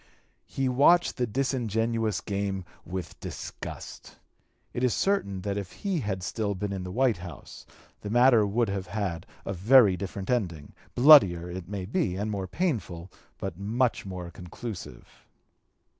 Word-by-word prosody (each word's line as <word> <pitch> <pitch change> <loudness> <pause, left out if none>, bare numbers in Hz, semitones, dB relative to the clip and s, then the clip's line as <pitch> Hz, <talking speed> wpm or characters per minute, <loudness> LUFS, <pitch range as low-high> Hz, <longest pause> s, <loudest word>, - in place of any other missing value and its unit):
He 135 -1 -1
watched 145 +8 +4
the 125 -2 0
disingenuous 115 -3 0
game 100 -2 -3 0.2
with 90 -3 -6
disgust. - - -8 0.6
It 120 - -2
is 125 -4 +2
certain 100 - 0
that 100 +1 -2
if 95 -3 -7
he 195 -4 -2
had 95 -7 -3
still 100 +2 -2
been 100 +1 -3
in 95 - -4
the 90 - -6
White 125 0 +2
House, 85 -4 -10 0.3
the 105 - -6
matter 120 0 +5
would 110 +3 +1
have 100 -1 -3
had 95 -6 -3 0.2
a 100 - -2
(p. 90 - -9
237) 105 - -9
very 125 -8 +8
different 95 +1 -6
ending, 85 -12 -2 0.2
bloodier, 95 - +7
it 90 -1 -7
may 100 -3 -4
be, 110 - -1
and 105 +3 -2
more 95 -2 -3
painful, 95 - -2 0.3
but 85 - -5
much 115 +5 0
more 90 -3 -7
conclusive. 90 +4 -8
100 Hz, 160 wpm, -27 LUFS, 95-120 Hz, 0.6 s, very